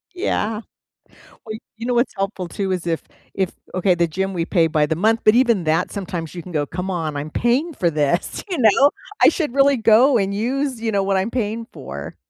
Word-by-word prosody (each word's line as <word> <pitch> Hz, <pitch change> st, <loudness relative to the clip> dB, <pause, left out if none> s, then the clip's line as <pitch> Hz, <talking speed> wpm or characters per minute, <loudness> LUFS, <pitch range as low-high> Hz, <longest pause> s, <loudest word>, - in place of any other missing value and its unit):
Yeah. 225 Hz, -, -1 dB, 0.8 s
Well, 215 Hz, -1 st, -5 dB, 0.2 s
you 230 Hz, -, -6 dB
know 250 Hz, -, +1 dB
what's 240 Hz, +2 st, +1 dB
helpful 195 Hz, -3 st, -3 dB
too 195 Hz, -2 st, -3 dB
is 180 Hz, -2 st, -4 dB
if 165 Hz, -2 st, -1 dB, 0.3 s
if 190 Hz, -2 st, -1 dB, 0.2 s
okay, 185 Hz, 0 st, +2 dB
the 170 Hz, 0 st, +1 dB
gym, 190 Hz, +4 st, -3 dB
we 170 Hz, -2 st, -1 dB
pay 170 Hz, -2 st, +2 dB
by 155 Hz, -2 st, +2 dB
the 160 Hz, -, -1 dB
month. 225 Hz, +5 st, +2 dB
But 215 Hz, -, +6 dB
even 235 Hz, -7 st, +3 dB
that, 160 Hz, +2 st, +1 dB
sometimes 180 Hz, -5 st, -5 dB
you 175 Hz, -, -6 dB
can 180 Hz, -, -10 dB
go, 150 Hz, -3 st, 0 dB
"Come 180 Hz, +6 st, -4 dB
on, 160 Hz, -4 st, -3 dB
I'm 145 Hz, +2 st, -4 dB
paying 255 Hz, -, 0 dB
for 175 Hz, -10 st, +1 dB
this." 150 Hz, +1 st, -1 dB
You 355 Hz, -, -2 dB
know? 260 Hz, +5 st, +5 dB, 0.3 s
"I -, -, +9 dB
should 295 Hz, -7 st, -3 dB
really 275 Hz, 0 st, +4 dB
go 235 Hz, +4 st, +5 dB
and 200 Hz, -2 st, 0 dB
use, 255 Hz, +3 st, -2 dB
you 225 Hz, -, -1 dB
know, 200 Hz, -2 st, +1 dB
what 195 Hz, 0 st, 0 dB
I'm 190 Hz, +4 st, 0 dB
paying 230 Hz, -2 st, -2 dB
for." -, -, -8 dB
195 Hz, 220 wpm, -21 LUFS, 175-235 Hz, 0.8 s, I